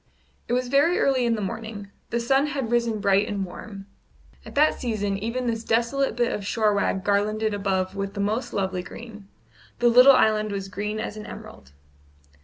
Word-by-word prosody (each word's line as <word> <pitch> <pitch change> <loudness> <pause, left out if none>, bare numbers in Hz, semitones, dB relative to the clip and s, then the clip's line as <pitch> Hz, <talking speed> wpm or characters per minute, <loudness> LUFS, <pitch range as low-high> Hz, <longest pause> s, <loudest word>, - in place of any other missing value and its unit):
It - - -2
was 250 0 0
very 285 +7 +3
early 260 -3 +2
in 230 - +2
the 215 - -3
morning; 210 0 -6 0.2
the 235 - -1
sun 270 +5 +2
had 270 -5 -3
risen 235 -2 +1
bright 200 0 +2
and 200 -2 -2
warm. 195 +2 -10 0.6
At - - -12
that 300 +2 +3
season 210 -5 -1
even 230 +4 -3
this 225 -1 -2
desolate 235 +3 0
bit 240 0 +1
of 205 - -4
shore 215 +1 +1
wag 200 -1 0
garlanded 210 +2 +1
above 190 -1 -1
with 200 +1 -4
the - - -5
most 215 +5 -1
lovely 190 -2 -2
green; 215 +1 -11 0.5
the 240 - +4
little 250 +3 +8
island 215 -2 +2
was 195 -1 -4
green 210 +2 -4
as 215 -1 -5
an 210 - -8
emerald. 65 - -11
215 Hz, 190 wpm, -24 LUFS, 200-240 Hz, 0.6 s, little